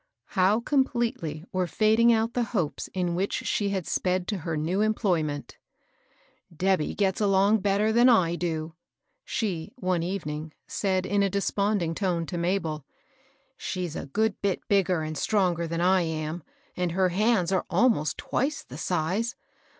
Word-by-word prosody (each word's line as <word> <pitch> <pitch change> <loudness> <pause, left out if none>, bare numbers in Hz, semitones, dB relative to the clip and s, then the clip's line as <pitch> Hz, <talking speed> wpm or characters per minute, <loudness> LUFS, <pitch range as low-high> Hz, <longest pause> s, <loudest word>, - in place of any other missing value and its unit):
How 195 +3 +3
com 270 +3 +3
pletely 180 - -3
were 185 -1 0
fading 220 +4 +4
out 225 +1 +1
the 245 - 0 0.2
hopes 155 -6 -2
in 180 -2 -1
which 190 +3 -1
she 205 -1 0
had 190 -4 -2
sped 180 -1 0
to 205 -3 -2
her 160 -1 -3
new 170 +6 0
employment! 175 -9 -1 0.5
" 165 - -28
Debby 190 -5 +1
gets 195 0 0
along 200 +1 +4
better 205 +2 +2
than 240 +3 +5
I 185 -8 +4
do," 165 -2 -3 0.5
she, 185 -6 -3
one 185 -8 0
evening, 160 -4 -4
said 190 -2 -1
in 200 +1 +1
desponding 200 -2 0
tone 175 -2 -1
to 175 +1 -4
Mabel. 170 -4 -1 0.4
*' 265 - -33 0.3
She's 180 -4 -4
a - - -5
good 215 +8 0
bit 200 -2 -1
bigger 185 -4 +2
and 155 0 -4
stronger 175 -1 +1
than 165 +1 -2
I 185 +1 +4
am, 160 0 -3 0.3
and 180 -2 -1
her 185 0 +2
hands 195 -1 +2
are 190 - 0
almost 180 - +2
twice 285 +4 -2
the - - -10
size. 185 +8 -1
185 Hz, 160 wpm, -27 LUFS, 165-210 Hz, 0.5 s, than